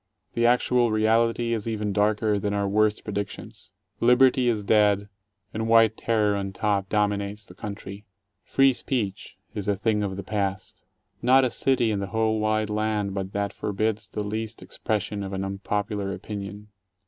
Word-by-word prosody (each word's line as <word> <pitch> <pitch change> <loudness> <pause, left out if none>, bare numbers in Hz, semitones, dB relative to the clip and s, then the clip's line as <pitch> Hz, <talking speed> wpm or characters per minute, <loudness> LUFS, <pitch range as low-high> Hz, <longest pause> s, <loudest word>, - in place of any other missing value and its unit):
The 120 0 +2
actual 125 0 +3
reality 115 +2 +2
is 110 -1 -3
even 105 -2 -2
darker 105 +1 +2
than 100 +1 -1
our 100 0 0
worst 105 +1 +2
predictions. 100 -4 -6 0.3
Liberty 125 +1 +4
is 110 -3 +1
dead, 105 -1 +3 0.4
and 110 +1 -2
white 115 -1 +5
terror 105 -3 +1
on 100 -1 -3
top 100 -1 0
dominates 105 0 -1
the - - -14
country. 100 0 -8 0.4
Free 135 -1 +4
speech 105 -6 -3 0.2
is 105 -2 -5
a 100 - +2
thing 105 +1 0
of 95 -2 -3
the 100 - -5
past. 100 -1 -3 0.4
Not 130 +2 +5
a 125 - -1
city 125 -4 +2
in 100 - -1
the 100 - -3
whole 110 0 0
wide 110 0 0
land 105 -2 -1
but 95 -1 -4
that 100 0 -2
forbids 105 0 -2
the 105 - -3
least 110 +2 -4
expres 105 -3 -2
sion 105 -1 -5
of 100 0 -5
an 95 0 -2
unpopular 100 +1 -2
opinion. 105 +1 -7
105 Hz, 170 wpm, -25 LUFS, 100-110 Hz, 0.4 s, white